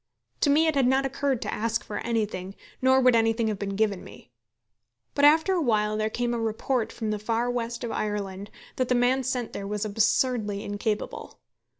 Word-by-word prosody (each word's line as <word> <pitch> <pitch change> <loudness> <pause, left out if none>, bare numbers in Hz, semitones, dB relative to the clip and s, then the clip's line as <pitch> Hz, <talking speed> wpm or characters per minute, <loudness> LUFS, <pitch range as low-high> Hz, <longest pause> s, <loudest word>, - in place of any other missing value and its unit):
To - - +2
me 305 +3 +4
it 315 - +2
had 275 -3 +3
not 265 +1 +2
occurred 270 -2 -1
to - - -3
ask 230 +2 -1
for 210 - -5
anything, 205 -5 -2 0.3
nor 260 +1 +5
would 255 -2 +5
anything 225 0 +2
have 210 -3 -3
been 200 -1 -3
given 205 -3 0
me. 125 - -14 0.8
But 285 - +3
after 320 +5 +5
a 360 - +1
while 215 -5 +1
there 215 0 0
came 240 +1 -1
a 235 - -1
report 225 +2 -1
from 220 -2 -3
the 210 - -2
far 230 +3 -1
west 235 0 -3
of 235 - -3
Ireland 205 -1 -3 0.3
that 255 - +1
the 250 - +3
man 250 +2 +3
sent 250 -2 -3
there 195 - -5
was 210 +1 -2
absurdly 215 0 +1
incapable. 205 +1 -4
230 Hz, 200 wpm, -26 LUFS, 210-255 Hz, 0.8 s, nor